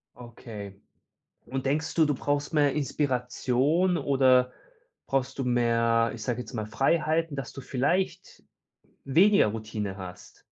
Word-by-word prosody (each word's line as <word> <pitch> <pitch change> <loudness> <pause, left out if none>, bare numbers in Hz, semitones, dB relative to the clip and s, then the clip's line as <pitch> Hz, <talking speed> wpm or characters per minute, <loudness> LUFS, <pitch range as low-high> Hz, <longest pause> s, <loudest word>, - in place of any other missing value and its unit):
Okay. 110 -4 -10 0.7
Und 135 0 -4
denkst 150 +4 -1
du, 160 -2 +5
du 145 - 0
brauchst 145 +3 -2
mehr 145 -3 +3
Inspiration, 140 +4 0
oder 130 -3 +3 0.5
brauchst 135 0 -1
du - - 0
mehr, 115 -2 +2
ich 110 -2 -7
sage 120 0 -2
jetzt 125 - -11
mal, 110 -2 -3
Freiheiten, 155 +6 0
dass 135 -4 -5
du 135 - -9
vielleicht 175 +9 -2 0.6
weniger 180 - +4
Routine 105 -2 -4
hast? 90 -2 -11
130 Hz, 130 wpm, -27 LUFS, 115-150 Hz, 0.7 s, du